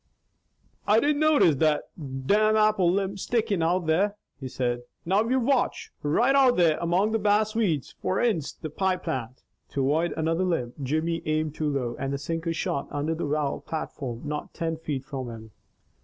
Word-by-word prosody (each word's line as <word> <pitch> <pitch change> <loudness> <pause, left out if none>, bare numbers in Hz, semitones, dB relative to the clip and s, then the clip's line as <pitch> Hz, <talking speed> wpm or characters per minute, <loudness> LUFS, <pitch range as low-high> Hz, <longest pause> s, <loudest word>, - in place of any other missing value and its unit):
"I 210 +2 +5
didn't 290 +3 +1
notice 295 - +4
that 155 +1 +2
domn 165 +10 +1
apple 215 -5 +4
limb 195 +1 -1
stickin' 215 -3 0
out 175 +2 +1
there," 195 +6 +2 0.2
he 135 - -5
said. 120 -1 -2 0.2
"Now 195 +5 +3
you 260 +1 +3
watch! 260 +1 0
Right 235 - +2
out 265 -3 +5
there 165 -3 +3
among 180 +5 +1
the 225 - +1
bass 210 +1 +2
weeds 185 - 0
foreninst 190 - 0
the 155 - -5
pie 190 +3 +1
plant." 130 -7 -5 0.3
To 140 - 0
avoid 155 +6 +1
another 165 +3 +1
limb, 145 -10 -1
Jimmy 155 +5 -1
aimed 155 -1 0
too 155 -1 -1
low 125 -4 -2
and 135 0 -2
the 140 - -1
sinker 165 +4 -3
shot 140 -3 -2
under 145 +3 -1
the 160 -2 -3
well 145 -1 -1
platform 135 -6 -5
not 150 0 -5
ten 165 -1 -2
feet 145 -4 -4
from 130 -4 -5
him. 110 -1 -10
165 Hz, 175 wpm, -26 LUFS, 145-205 Hz, 0.3 s, I